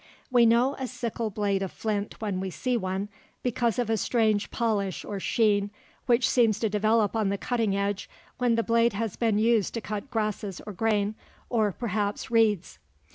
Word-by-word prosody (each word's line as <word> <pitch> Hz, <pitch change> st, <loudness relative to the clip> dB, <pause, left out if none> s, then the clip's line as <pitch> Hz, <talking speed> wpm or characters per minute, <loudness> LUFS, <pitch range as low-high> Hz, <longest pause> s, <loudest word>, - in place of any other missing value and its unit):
We 240 Hz, -2 st, +6 dB
know 240 Hz, +4 st, +4 dB
a 260 Hz, -, -2 dB
sickle 235 Hz, -2 st, -3 dB
blade 200 Hz, -1 st, 0 dB
of 195 Hz, -, -3 dB
flint 210 Hz, -2 st, -3 dB
when 205 Hz, -4 st, -2 dB
we 190 Hz, 0 st, -3 dB
see 250 Hz, +7 st, -1 dB
one, 190 Hz, -2 st, -2 dB, 0.4 s
because 240 Hz, -1 st, 0 dB
of 245 Hz, -2 st, 0 dB
a 225 Hz, 0 st, +1 dB
strange 215 Hz, -2 st, +1 dB
polish 205 Hz, -5 st, -1 dB
or 205 Hz, -1 st, -4 dB
sheen 205 Hz, -1 st, +2 dB, 0.4 s
which 240 Hz, -1 st, +4 dB
seems 230 Hz, -4 st, +3 dB
to 220 Hz, -, +1 dB
develop 215 Hz, +1 st, +2 dB
on 215 Hz, -3 st, +1 dB
the 200 Hz, -, -1 dB
cutting 225 Hz, -3 st, 0 dB
edge 200 Hz, 0 st, -2 dB, 0.3 s
when 245 Hz, -2 st, +3 dB
the 230 Hz, -, +1 dB
blade 230 Hz, 0 st, +3 dB
has 215 Hz, -1 st, -2 dB
been 225 Hz, -3 st, +1 dB
used 220 Hz, -2 st, +2 dB
to -, -, -1 dB
cut 210 Hz, +5 st, -5 dB
grasses 210 Hz, -4 st, -2 dB
or 210 Hz, -, -6 dB
grain, 210 Hz, +1 st, +1 dB, 0.4 s
or 220 Hz, -4 st, +2 dB
perhaps 210 Hz, 0 st, -2 dB
reeds. 215 Hz, -6 st, +2 dB
215 Hz, 185 wpm, -27 LUFS, 205-230 Hz, 0.4 s, We